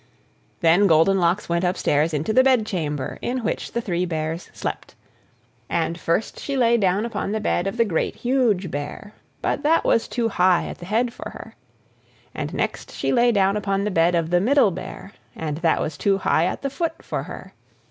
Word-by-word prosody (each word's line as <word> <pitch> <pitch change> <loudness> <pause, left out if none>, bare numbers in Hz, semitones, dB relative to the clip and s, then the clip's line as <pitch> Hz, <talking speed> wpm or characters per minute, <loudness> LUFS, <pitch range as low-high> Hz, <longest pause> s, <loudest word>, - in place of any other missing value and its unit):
Then 175 +5 +5
Goldenlocks 175 +3 +3
went 170 +1 0
upstairs 165 -3 +1
into 155 +8 -1
the 260 - +6
bedchamber 180 - 0
in 250 0 -2
which 220 - -3
the 235 - -1
three 180 -5 -1
Bears 160 0 -3
slept. - - -6 0.7
And 165 +1 -1
first 170 +7 -1
she 280 -1 -3
lay 235 -2 +4
down 200 -1 +1
upon 220 -3 -3
the 220 - 0
bed 195 -3 0
of 195 - -4
the 230 - +4
Great, 170 -7 -1
Huge 235 -9 +1
Bear, 145 +8 -6 0.3
but - - 0
that 320 +3 +3
was 230 - +2
too 230 -1 -1
high 180 -3 +3
at - - -8
the 175 - -9
head 230 +4 0
for - - -7
her. - - -11 0.8
And - - -4
next - - -3
she - - -1
lay 240 -1 +4
down 200 -2 +2
upon 195 -1 -1
the 210 - -1
bed 170 0 +3
of 165 -1 0
the 175 0 +3
Middle 255 -1 +4
Bear, 190 +2 -8 0.2
and 150 -2 -4
that 165 -1 +2
was 145 -2 -3
too 195 +6 +2
high 170 -3 +2
at 185 - -3
the 275 - -2
foot 330 +4 -3
for - - -3
her. - - -9
195 Hz, 195 wpm, -23 LUFS, 170-230 Hz, 0.8 s, the